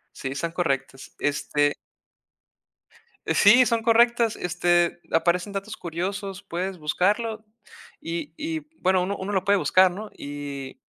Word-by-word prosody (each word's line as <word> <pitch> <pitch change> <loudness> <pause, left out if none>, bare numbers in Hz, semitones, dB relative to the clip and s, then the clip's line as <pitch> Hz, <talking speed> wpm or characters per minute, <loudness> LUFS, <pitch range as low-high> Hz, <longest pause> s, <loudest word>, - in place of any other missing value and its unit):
Sí, 135 - -5
están 140 +5 -3
correctas. 135 -6 -3
Este 145 0 +1 1.5
Sí, 240 +5 +6
son 230 0 0
correctas. 235 0 +4
Este, 175 0 +1
aparecen 175 +4 +1
datos 200 +2 -5
curiosos, 190 +3 -4
puedes 185 +1 -4
buscarlo 210 +8 0 0.6
y 165 -2 -5
y 320 0 -3 0.2
bueno, 185 -1 +3
uno, 200 +2 -2
uno 200 +2 -4
lo 190 -1 +1
puede 205 0 +3
buscar, 185 -1 +4
¿no? 210 +4 -7
Y 140 -2 -7
185 Hz, 125 wpm, -25 LUFS, 165-205 Hz, 1.5 s, Sí